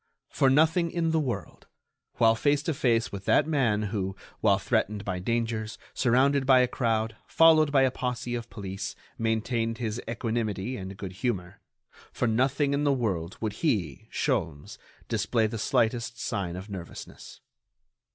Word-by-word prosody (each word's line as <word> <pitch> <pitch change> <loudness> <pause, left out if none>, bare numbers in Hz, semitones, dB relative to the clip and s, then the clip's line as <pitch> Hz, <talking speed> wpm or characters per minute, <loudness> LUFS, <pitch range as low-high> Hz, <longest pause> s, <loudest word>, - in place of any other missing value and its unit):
For 135 - +3
nothing 160 +5 +3
in 165 -1 0
the 160 - +2
world, 120 -10 -4 0.5
while 115 -1 +5
face 145 +5 +1
to 165 - -1
face 120 -4 +1
with 100 -1 -7
that - - +4
man 125 -9 +1
who, 95 -2 -2 0.2
while - - +4
threatened 105 0 -1
by 95 -2 -2
dangers, 115 +1 -2 0.2
surrounded 135 +2 +3
by 130 -2 +7
a 125 - +3
crowd, 115 -3 -1
followed 160 -2 +5
by 135 -2 +5
a 130 - +3
posse 125 -1 -3
of 120 -1 -4
police, 95 -2 -6 0.2
maintained 115 +1 0
his 115 -1 -3
equanimity 115 -1 -2
and 95 -2 -7
good 95 -3 -6
humor, 90 -3 -3 0.5
for 120 - -1
nothing 135 +5 +1
in 140 +1 0
the 145 - +3
world 95 -10 -1
would 110 -2 -1
he, 100 - -1
Sholmes, 75 -3 -2 0.3
display 115 -2 +1
the 110 +1 -3
slightest 115 +2 0
sign 90 -3 -3
of 95 +2 -7
nervousness. 95 -4 -9
115 Hz, 155 wpm, -27 LUFS, 105-130 Hz, 0.5 s, by